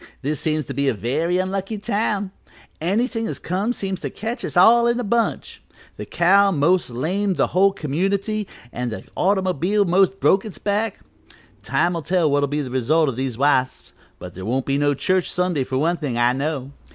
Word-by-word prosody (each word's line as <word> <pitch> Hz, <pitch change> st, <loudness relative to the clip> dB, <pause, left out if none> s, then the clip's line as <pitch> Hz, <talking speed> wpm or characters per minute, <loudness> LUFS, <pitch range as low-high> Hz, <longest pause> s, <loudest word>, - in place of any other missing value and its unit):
This 145 Hz, +1 st, -2 dB
seems 155 Hz, -2 st, -1 dB
to -, -, -6 dB
be 140 Hz, +2 st, 0 dB
a 130 Hz, -, +1 dB
very 155 Hz, -, -1 dB
unlucky 195 Hz, +3 st, -2 dB
town. 205 Hz, -2 st, -1 dB, 0.5 s
Anything 225 Hz, +6 st, 0 dB
as -, -, -4 dB
comes 200 Hz, +7 st, -2 dB
seems 190 Hz, -2 st, -3 dB
to -, -, -4 dB
catch 235 Hz, +3 st, -5 dB
us -, -, -4 dB
all 235 Hz, +6 st, +6 dB
in 235 Hz, +1 st, +1 dB
a -, -, -2 dB
bunch. 230 Hz, +2 st, -1 dB, 0.3 s
The -, -, -8 dB
cow 195 Hz, +4 st, +4 dB
most 175 Hz, 0 st, +2 dB
lamed 185 Hz, +10 st, -1 dB
the -, -, +3 dB
whole 195 Hz, +2 st, +4 dB
community 195 Hz, +7 st, -2 dB, 0.3 s
an' 125 Hz, 0 st, -3 dB
the 110 Hz, -, -6 dB
automobile 190 Hz, +1 st, +1 dB
most 190 Hz, +2 st, +2 dB
broke 195 Hz, -, +3 dB
its 210 Hz, -5 st, -8 dB
back; 205 Hz, +1 st, -2 dB, 0.6 s
time'll 170 Hz, -1 st, 0 dB
tell 165 Hz, -1 st, +1 dB
what'll 145 Hz, 0 st, +2 dB
be 150 Hz, +1 st, -1 dB
the 130 Hz, -3 st, -6 dB
result 145 Hz, +5 st, +2 dB
o' -, -, -1 dB
these 130 Hz, -1 st, -4 dB
wasps, 130 Hz, -2 st, 0 dB, 0.2 s
but -, -, -9 dB
there 95 Hz, -, -8 dB
won't 125 Hz, +6 st, -1 dB
be 140 Hz, +1 st, 0 dB
no 145 Hz, 0 st, +2 dB
church 185 Hz, +5 st, 0 dB
Sunday 180 Hz, -6 st, 0 dB
for 130 Hz, 0 st, -3 dB
one 165 Hz, +5 st, +1 dB
thing, 135 Hz, -7 st, -3 dB
I 120 Hz, +1 st, +3 dB
know. 140 Hz, -1 st, -3 dB
175 Hz, 190 wpm, -21 LUFS, 140-200 Hz, 0.6 s, all